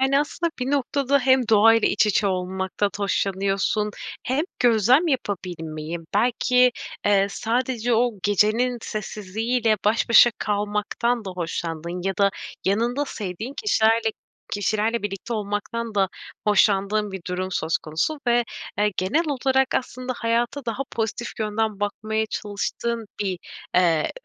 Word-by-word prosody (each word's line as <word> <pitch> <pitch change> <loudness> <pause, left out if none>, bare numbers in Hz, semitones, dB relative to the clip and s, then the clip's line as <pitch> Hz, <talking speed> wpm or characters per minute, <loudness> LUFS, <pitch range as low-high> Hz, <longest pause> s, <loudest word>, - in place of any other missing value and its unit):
Yani, 265 +1 +3
aslında 335 +3 -2
bir 250 +2 -1
noktada 280 0 +1
hem 260 -2 +3
doğayla 225 +1 +5
iç 210 - +3
içe 210 0 +2
olmaktan 190 +1 -1
hoşlanıyorsun 200 +1 0 0.3
hem 265 +6 0
gözlem 245 - +4
yapabilmeyi. 170 - -3 0.2
Belki, 250 +3 +3 0.3
eee, 200 -1 +4
sadece 240 +2 0
o 240 +1 +2
gecenin 215 +5 +2
sessizliği 215 +3 -3
ile 220 -2 +3
baş 215 +3 +2
başa 235 +1 +8
kalmaktan 210 +3 -1
da 190 - -4
hoşlandığın 170 0 -4
ya 195 -1 -1
da 200 -1 +4 0.4
yanında 235 +8 +1
sevdiğin 215 +4 -5
kişilerle 225 - +3 0.4
kişilerle 215 +2 0
birlikte 205 +3 -4
olmaktan 215 +2 -3
da 195 -2 +2 0.4
hoşlandığın 205 0 +2
bir 190 - -5
durum 185 +1 -2
söz 160 -1 0
konusu 165 - -2
ve, 240 0 +3 0.3
eee, 210 0 +2
genel 205 - +1
olarak 265 -1 +1
aslında 255 0 -2
hayata 240 +4 -1
daha 230 +3 -1
pozitif 225 +1 -2
yönden 215 -1 -1
bakmaya 215 +2 -1
çalıştığın 220 +2 -3
bir, 190 -3 -1 0.4
eee, 170 -4 +3
215 Hz, 130 wpm, -24 LUFS, 195-240 Hz, 0.4 s, başa